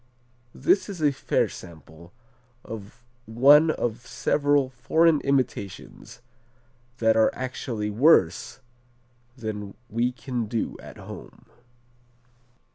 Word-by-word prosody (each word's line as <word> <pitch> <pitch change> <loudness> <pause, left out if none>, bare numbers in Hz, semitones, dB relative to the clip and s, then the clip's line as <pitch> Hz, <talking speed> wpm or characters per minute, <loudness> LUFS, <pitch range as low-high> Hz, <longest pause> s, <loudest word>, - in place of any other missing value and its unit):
This 360 - +2
is 195 -4 -7
a 150 -2 +3
fair 135 - 0
sample 85 0 -13 0.5
of 110 +2 -10 0.2
one 140 +8 +6
of 120 -5 -3
several 145 -2 +1
foreign 150 +6 +2
imitations 130 -10 -3 0.8
that 110 -2 +3
are 110 0 +4
actually 120 -4 -4
worse 125 - +3 0.8
than 105 -4 -6 0.2
we 120 +3 0
can 125 -3 -4
do 115 +1 -3
at - - -12
home. - - -11
120 Hz, 100 wpm, -25 LUFS, 110-140 Hz, 0.8 s, one